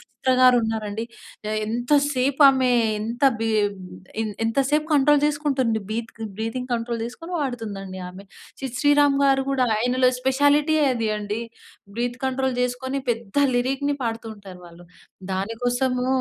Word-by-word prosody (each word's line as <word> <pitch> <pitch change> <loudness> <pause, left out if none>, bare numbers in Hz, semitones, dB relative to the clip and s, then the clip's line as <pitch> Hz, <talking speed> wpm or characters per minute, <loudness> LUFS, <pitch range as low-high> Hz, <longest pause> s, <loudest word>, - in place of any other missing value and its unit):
'చిత్ర' 260 -1 -2
గారు 255 -1 +7
ఉన్నారండి. 220 0 -3 0.5
ఎ - - -1
ఎంత 240 +5 -2 0.2
సేపు 270 +3 +1
ఆమె 260 -2 +3 0.3
ఎంత 230 +5 -5 0.2
బి 225 0 -1 0.7
ఎం 220 - -2 0.2
ఎంత 225 +3 -1
సేపు 300 +1 +1
కంట్రోల్ 290 0 +4
చేసుకుంటుంది 275 -7 0
బీత్‌గ్ 225 0 -5 0.2
బ్రీతింగ్ 240 +3 -3
కంట్రోల్ 235 0 -2
చేసుకొని 330 +9 -8
వాడుతుందండి 205 -8 -5
ఆమె. 185 +2 -11 0.4
'సిద్ 255 -2 -5
శ్రీరామ్' 290 -1 +4
గారు 270 -1 +3
కూడా 260 -2 +2
అయన‌లో 250 +2 +2
స్పెషాలిటీ 285 +4 +3 0.2
అది 230 -2 -1
అండి. 210 +2 -4 0.6
బ్రీత్ 245 +1 -2
కంట్రోల్ 265 -1 0
చేసుకొని 260 +2 -2
పెద్ద 230 -2 -5 0.2
లిరిక్‌ని 270 +3 0
పాడుతూ 230 -1 -3
ఉంటారు 190 -3 -12
వాళ్ళు. 170 +1 -15 0.5
దాని 200 +4 -3
కోసము 250 +1 0
250 Hz, 140 wpm, -23 LUFS, 225-270 Hz, 0.7 s, గారు